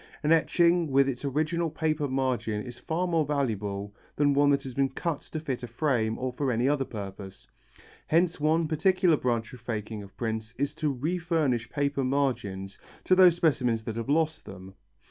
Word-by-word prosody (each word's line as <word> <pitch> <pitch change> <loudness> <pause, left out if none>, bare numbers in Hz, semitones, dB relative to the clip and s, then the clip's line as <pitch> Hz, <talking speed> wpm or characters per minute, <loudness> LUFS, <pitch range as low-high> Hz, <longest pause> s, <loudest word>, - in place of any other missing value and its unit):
An 150 - +2
etching 170 0 +3
with 135 0 +4
its 130 -1 -3
original 155 +4 0
paper 155 -1 -1
margin 125 -5 -1
is 120 -1 -9
far 170 +3 -1
more 165 -3 +2
valuable 105 -8 -2 0.2
than 145 -1 +3
one 145 +1 +4
that 140 -1 +2
has 130 - -7
been 135 +1 +1
cut 155 +3 -3
to 155 - -6
fit 135 -5 -4
a 125 - -5
frame 115 -7 0
or 130 -1 -3
for 135 0 -1
any 120 +2 +1
other 140 -1 +1
purpose. 100 -3 -8 0.6
Hence 170 +1 +2
one 160 +2 +2
particular 175 +2 +3
branch 120 -3 -1
of 125 - -10
faking 110 -2 -4
of 100 - -10
the - - -36
prints 110 -1 -4
is 140 +1 -1
to 155 -1 -1
refurnish 155 -4 -1
paper 140 -1 -1
margins 120 -8 -1 0.2
to - - +3
those 185 -2 +7
specimens 125 -9 +1
that 110 0 -5
have 115 +3 -4
lost 160 +1 +1
them. 95 0 -10
140 Hz, 185 wpm, -28 LUFS, 115-155 Hz, 0.6 s, those